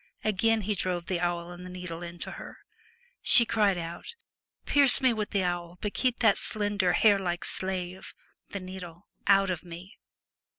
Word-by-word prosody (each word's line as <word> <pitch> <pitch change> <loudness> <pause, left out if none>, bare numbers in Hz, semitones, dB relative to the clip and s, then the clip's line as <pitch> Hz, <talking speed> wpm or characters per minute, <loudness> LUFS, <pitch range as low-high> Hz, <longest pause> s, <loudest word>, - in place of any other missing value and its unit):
Again 220 +2 +1
he 210 +1 -2
drove 180 -3 -3
the 180 -1 -2
awl 175 0 -2
and 175 0 -10
needle 180 -2 -7
into 175 0 -7
her. - - -10 0.6
She 245 -4 +6
cried 210 -4 +1
out, 170 - -7 0.2
' - - -54
Pierce 280 -3 +7
me 260 -2 +3
with 215 -2 -3
the 200 -2 0
awl, 175 -1 -4
but 210 - -4
keep 255 -2 -1
that 220 -4 +4
slender, 205 -4 -1
hair 205 +1 +4
like 175 -2 -3
slave 185 -1 -5 0.3
(the 200 - -5
needle) 185 -1 -10 0.2
out 195 -1 +4
of 175 - -4
me.' 175 +2 -12
185 Hz, 170 wpm, -27 LUFS, 175-210 Hz, 0.6 s, Pierce